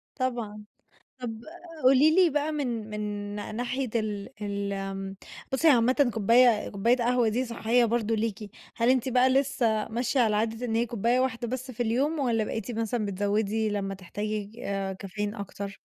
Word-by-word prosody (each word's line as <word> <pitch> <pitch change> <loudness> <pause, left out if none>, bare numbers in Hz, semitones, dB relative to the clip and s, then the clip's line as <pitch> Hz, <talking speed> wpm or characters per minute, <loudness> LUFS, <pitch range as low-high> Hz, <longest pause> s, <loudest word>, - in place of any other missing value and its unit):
طبعًا، 235 -5 -3 0.6
طَب 225 -2 -5 0.4
قولي 275 +5 +6
لي 365 -3 +6
بقى 295 +1 0
من، 240 -7 -3
من 210 0 -5 0.4
نا 210 - -5
ناحية 250 +2 -2
ال 210 -3 -2
ال 200 -1 -2
آمم، 195 0 -5 0.4
بُصّي 320 +5 +3
هي - - +9
عامةً 255 +2 +3
كوباية 230 +1 +4
كوباية 230 +5 +2
قهوة 245 0 +2
دي 250 +4 0
صحّية 235 +1 +2
برضه 225 -1 0
ليكِ، 215 -1 -3 0.3
هل 230 +1 +2
أنتِ 260 0 +2
بقى 255 +1 +4
لسه 255 -5 +1
ماشية 245 +3 -1
على 220 -3 +3
عادة 225 +2 -1
إن 225 -2 -1
هي 235 +1 +2
كوباية 235 +2 +1
واحدة 240 -2 -1
بس 255 +2 -4
في 240 0 -2
اليوم، 275 +7 0
والَّا 235 -5 +1
بقيتِ 225 +2 -4
مثلًا 225 0 -1
بتزوّدي 205 +2 0
لمّا 200 -1 -2
تحتاجي 205 +3 -4
ج 225 +4 -15
آآ، 195 -1 -2
كافيين 205 +3 -4
أكتر؟ 200 -1 -6
230 Hz, 175 wpm, -27 LUFS, 210-250 Hz, 0.6 s, هي